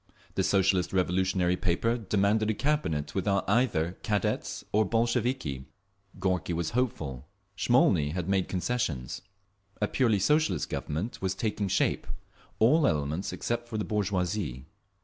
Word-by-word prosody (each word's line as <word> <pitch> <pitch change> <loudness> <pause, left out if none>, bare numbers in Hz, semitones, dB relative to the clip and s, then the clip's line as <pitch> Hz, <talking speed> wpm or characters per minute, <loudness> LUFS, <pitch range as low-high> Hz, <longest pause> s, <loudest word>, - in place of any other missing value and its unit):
The - - 0
Socialist 95 -2 +2
Revolutionary 90 0 +1
paper 95 +6 +1
demanded 105 0 +1
a 110 - +1
Cabinet 140 - -1
without 100 0 0
either 95 -6 +1
Cadets 105 -3 -1
or 110 +1 +4
Bolsheviki. 115 - 0 0.5
Gorky 90 -2 0
was 85 -1 -2
hopeful; 80 - -2 0.3
Smolny 90 - +3
had 90 -1 -3
made 95 -1 +1
concessions. 90 - -2 0.6
A 105 - +1
purely 115 -4 +2
Socialist 150 - +1
Government 90 +11 -3
was 95 0 -1
taking 105 -1 -1
shape—all 115 - 0
elements 75 +3 -1
except 120 0 -3
the 110 -3 -2
bourgeoisie. 95 - -1
95 Hz, 120 wpm, -29 LUFS, 90-115 Hz, 0.6 s, or